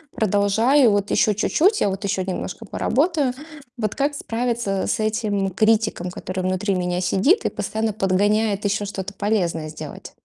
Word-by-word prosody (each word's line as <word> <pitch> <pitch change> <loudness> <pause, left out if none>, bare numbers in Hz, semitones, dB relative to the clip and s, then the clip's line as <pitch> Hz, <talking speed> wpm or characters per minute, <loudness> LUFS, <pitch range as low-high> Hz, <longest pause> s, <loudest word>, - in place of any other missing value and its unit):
продолжаю 220 +6 +3
вот 205 -1 0
еще 210 -2 +3
чуть-чуть, 370 - +2
а 200 - +2
вот 195 +2 -4
еще 195 -1 -1
немножко 185 -1 -5
поработаю. 290 -1 0 0.4
Вот 215 -2 -2
как 285 +1 -1
справиться 230 -6 -2
с - - 0
этим 215 -3 0
критиком, 215 -3 +1
который 185 +1 -6
внутри 185 +2 0
меня 180 -1 -1
сидит 210 - +2
и - - +2
постоянно 220 -1 -2
подгоняет 205 +2 +1
еще 205 +1 0
что-то 200 0 -5
полезное 180 -7 -1
сделать? 150 - -9
205 Hz, 150 wpm, -22 LUFS, 190-225 Hz, 0.4 s, продолжаю